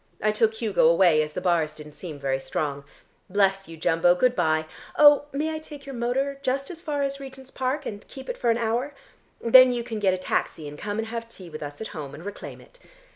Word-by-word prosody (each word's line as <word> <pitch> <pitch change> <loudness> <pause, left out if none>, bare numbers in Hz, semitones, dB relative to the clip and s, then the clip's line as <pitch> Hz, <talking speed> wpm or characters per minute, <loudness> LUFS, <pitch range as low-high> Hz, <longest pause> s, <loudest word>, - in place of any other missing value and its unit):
I 215 - +2
took 220 +1 +2
Hugo 215 -7 +2
away, 170 -2 +5
as 150 0 -4
the 180 - -4
bars 170 -4 +1
didn't 150 -1 -11
seem 160 -3 -8
very 135 -1 -1
strong. 140 0 -3 0.4
Bless 195 0 +2
you, 165 0 -10
Jumbo, 165 +2 +3
good 250 +6 +2
bye. 155 -4 +1 0.3
Oh, 290 -1 +7
may 310 +3 -1
I 315 - -4
take 295 -3 -11
your 275 - -7
motor 265 +3 -1
just 275 +2 -1
as 335 -2 -8
far 295 -4 -2
as 275 0 -2
Regent's 265 -1 -10
Park 265 +3 -2
and 205 -1 -7
keep 265 -1 -10
it - - -3
for 240 - -1
an 230 - +3
hour? 240 +5 -1 0.4
Then 255 +2 +7
you 240 -1 -2
can 230 -2 -5
get 190 -3 +2
a - - -5
taxi 165 -4 -2
and 145 - -8
come 205 +6 -4
and 225 0 -3
have 230 0 -5
tea 185 -6 -12
with 155 - -8
us 145 +3 -7
at 220 - -5
home, 145 -6 -7
and 160 - -11
reclaim 205 - -8
it. - - -18
220 Hz, 235 wpm, -25 LUFS, 165-265 Hz, 0.4 s, Oh